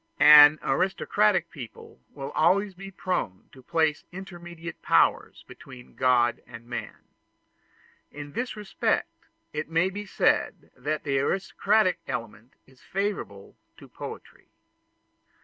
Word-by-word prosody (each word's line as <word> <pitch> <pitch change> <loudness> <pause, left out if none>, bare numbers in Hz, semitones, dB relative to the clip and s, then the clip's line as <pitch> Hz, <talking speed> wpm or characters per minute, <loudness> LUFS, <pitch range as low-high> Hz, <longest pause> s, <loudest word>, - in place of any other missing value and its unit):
An 150 0 +9
aristocratic 190 +6 +1
people 120 - -11
will 140 0 -7
always 195 +4 +2
be 195 +2 -10
prone 180 - -4
to 130 - -15
place 160 +2 0
intermediate 175 -2 -9
powers - - +1
between 125 -2 -13
God 120 -2 +2
and 115 -1 -11
man. 120 - -7 1.1
In 145 0 -9
this 245 -1 -3
respect 210 -2 -2 0.3
it 150 +1 -4
may 165 +3 +1
be 205 +2 -7
said - - 0
that 150 +4 -3
the 135 -2 0
aristocratic 195 +5 +1
element 115 +1 -6
is 130 -1 -23
favorable 190 - -4 0.2
to - - -14
poetry. - - -10
155 Hz, 115 wpm, -26 LUFS, 130-190 Hz, 1.1 s, An